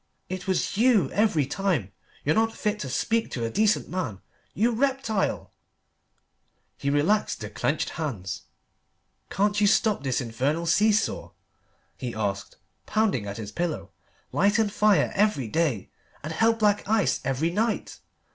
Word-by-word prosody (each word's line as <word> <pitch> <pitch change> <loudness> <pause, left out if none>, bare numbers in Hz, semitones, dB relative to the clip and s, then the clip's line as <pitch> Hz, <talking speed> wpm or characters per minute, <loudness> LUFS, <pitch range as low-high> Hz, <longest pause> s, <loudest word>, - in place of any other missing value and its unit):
It 185 +1 -5
was 190 +1 0
you 230 -3 +4
every 205 -9 +2
time. 145 - -1 0.3
You're 150 - +3
not 225 +3 +1
fit 210 0 -1
to 140 - -4
speak 225 - 0
to 120 -2 -2
a 115 - -3
decent 215 +1 +2
man, 170 - -3 0.4
you 230 +5 +2
reptile!" 250 -4 -1 1.2
He 140 - -2
relaxed 155 +10 +1
the 105 -1 -7
clenched 140 +8 -1
hands. 100 - -4 0.8
"Can't 205 +2 +1
you 205 - +5
stop 215 -2 +2
this 130 -3 0
infernal 135 +7 -1
see 205 +6 +4
saw?" 210 - -1 0.7
he 120 -3 -4
asked, 100 -2 -3 0.3
pounding 205 - +1
at 100 - -5
his 105 -2 -6
pillow; 170 +4 -3 0.4
"light 205 +3 +3
and 215 -3 +1
fire 210 -2 +3
every 200 - +1
day, 140 - -1 0.3
and 155 +2 -4
hell 225 +7 +3
black 210 -2 +1
ice 220 -3 +2
every 140 +6 0
night. 220 +4 -1
185 Hz, 145 wpm, -26 LUFS, 135-215 Hz, 1.2 s, you